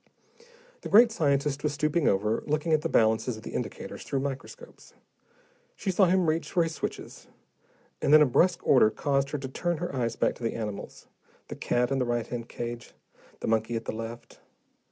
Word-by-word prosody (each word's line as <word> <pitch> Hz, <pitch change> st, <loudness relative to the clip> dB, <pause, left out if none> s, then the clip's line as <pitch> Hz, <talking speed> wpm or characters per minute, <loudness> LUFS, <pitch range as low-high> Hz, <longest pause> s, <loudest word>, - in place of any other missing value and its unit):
The -, -, -6 dB
great 230 Hz, +3 st, +7 dB
scientist 140 Hz, -5 st, 0 dB
was 150 Hz, 0 st, -1 dB
stooping 155 Hz, +1 st, +1 dB
over, 105 Hz, +3 st, +1 dB
looking 155 Hz, +2 st, 0 dB
at 155 Hz, -, +3 dB
the -, -, -2 dB
balances 110 Hz, +1 st, +2 dB
of 110 Hz, -, -12 dB
the -, -, -8 dB
indicators -, -, -5 dB
through 135 Hz, -, -2 dB
microscopes. 135 Hz, -1 st, -8 dB, 0.8 s
She 190 Hz, -, -2 dB
saw 190 Hz, +2 st, +4 dB
him 185 Hz, 0 st, +2 dB
reach 160 Hz, +1 st, -1 dB
for 175 Hz, -, +3 dB
his 165 Hz, 0 st, -3 dB
switches, -, -, -6 dB, 0.7 s
and -, -, +1 dB
then 155 Hz, 0 st, +8 dB
a -, -, +4 dB
brusk 175 Hz, +7 st, +2 dB
order 125 Hz, -5 st, +6 dB
caused 135 Hz, +5 st, 0 dB
her 150 Hz, -, -3 dB
to 135 Hz, -1 st, -5 dB
turn 170 Hz, +6 st, -2 dB
her 175 Hz, -3 st, -4 dB
eyes 115 Hz, -3 st, -1 dB
back -, -, +1 dB
to -, -, -11 dB
the 115 Hz, -, -1 dB
animals, 105 Hz, -3 st, -6 dB, 0.4 s
the -, -, -5 dB
cat 125 Hz, +2 st, 0 dB
in 135 Hz, -, +1 dB
the 125 Hz, -, +1 dB
right 120 Hz, -1 st, -1 dB
hand 120 Hz, -1 st, -6 dB
cage, 120 Hz, 0 st, -6 dB, 0.5 s
the -, -, -3 dB
monkey 110 Hz, +1 st, 0 dB
at 115 Hz, -, -4 dB
the -, -, -2 dB
left. 115 Hz, +1 st, -8 dB
135 Hz, 195 wpm, -27 LUFS, 115-155 Hz, 0.8 s, then